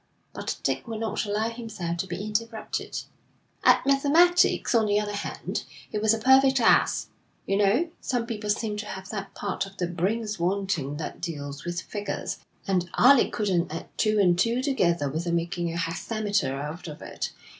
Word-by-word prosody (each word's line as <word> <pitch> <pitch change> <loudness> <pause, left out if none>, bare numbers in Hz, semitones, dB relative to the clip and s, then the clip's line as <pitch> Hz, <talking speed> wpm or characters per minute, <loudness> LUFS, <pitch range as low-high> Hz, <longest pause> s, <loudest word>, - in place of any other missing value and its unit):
But - - -4
Dick - - -1
would 225 -1 -4
not 220 -2 -1
allow 215 +2 0
himself 220 -8 -4
to 190 - -2
be 185 +4 -4
interrupted. 220 +1 -3 0.6
'At - - +5
mathematics, 295 +5 +4
on 225 -2 +4
the 205 0 +3
other 205 0 -3
hand, 205 - -4 0.3
he 210 - -1
was 215 0 +4
a 225 - +3
perfect 265 +3 +5
ass. 230 - +4 0.4
You 195 - +1
know, 225 - +3
some 245 -2 -1
people 215 -3 -5
seem 210 0 0
to 210 0 -5
have 190 0 -7
that 200 -2 -6
part 200 -1 -2
of 195 0 -15
their 175 - -1
brains 205 +4 -1
wanting 175 -6 -1
that 160 - -6
deals 145 -4 -5
with 175 +1 -2
figures, 200 -2 -4 0.3
and 180 -2 +1
Alec 270 0 +6
couldn't 185 -7 0
add 165 - -7
two 215 -1 +2
and 180 -4 +4
two 235 +5 +2
together 175 - +2
without 165 +5 -2
making 170 0 -1
a 165 - -4
hexameter 200 - -1
out 150 +5 -6
of 150 -2 -8
it. - - -4
205 Hz, 175 wpm, -26 LUFS, 175-225 Hz, 0.6 s, Alec